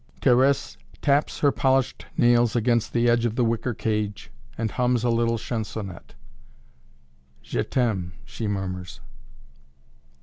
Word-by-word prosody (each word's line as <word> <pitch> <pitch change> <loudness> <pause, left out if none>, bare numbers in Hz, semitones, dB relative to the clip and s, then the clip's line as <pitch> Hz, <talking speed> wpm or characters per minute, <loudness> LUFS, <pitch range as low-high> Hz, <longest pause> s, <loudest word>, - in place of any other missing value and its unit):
Thérèse 130 - +3 0.3
taps 145 +1 +1
her 145 - +5
polished 135 -1 0
nails 120 -1 +4
against 120 -1 +1
the 120 0 +2
edge 120 0 +3
of 115 -2 0
the 125 - +2
wicker 115 +1 -1
cage 105 -2 -2 0.3
and 110 -1 -2
hums 125 -2 +1
a 120 - +2
little 115 0 +1
chansonette. 105 - -6 1.3
"Je - - -2
t'aime" 100 -9 -1
she 85 - -5
murmurs. 95 -7 -4
115 Hz, 125 wpm, -25 LUFS, 105-125 Hz, 1.3 s, her